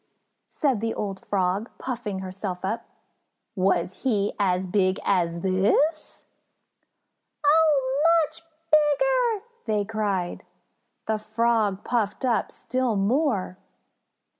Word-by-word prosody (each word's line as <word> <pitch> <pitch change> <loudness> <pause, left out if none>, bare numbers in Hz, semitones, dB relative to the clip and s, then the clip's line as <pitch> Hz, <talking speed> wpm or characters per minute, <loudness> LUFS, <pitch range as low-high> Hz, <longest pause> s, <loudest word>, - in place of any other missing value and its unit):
said 265 -8 0
the 225 0 -1
old 195 -2 -4
Frog, 195 +3 0
puffing 235 -6 -4
herself 185 -1 -5
up. 225 +4 -3 0.7
"Was 185 -1 0
he 210 -6 +1
as 185 -2 +1
big 185 0 +1
as 170 -3 +1
this?" 200 - +1 1.2
"Oh, 290 -3 +3 0.2
much 320 +2 -12 0.3
bigger!" 440 +10 +3 0.2
they 210 -2 +1
cried. 200 -5 -2 0.6
The 220 -1 -1
Frog 220 -2 0
puffed 230 0 -1
up 240 -3 +1
still 255 -3 -1
more. 205 - 0
215 Hz, 100 wpm, -25 LUFS, 190-260 Hz, 1.2 s, Oh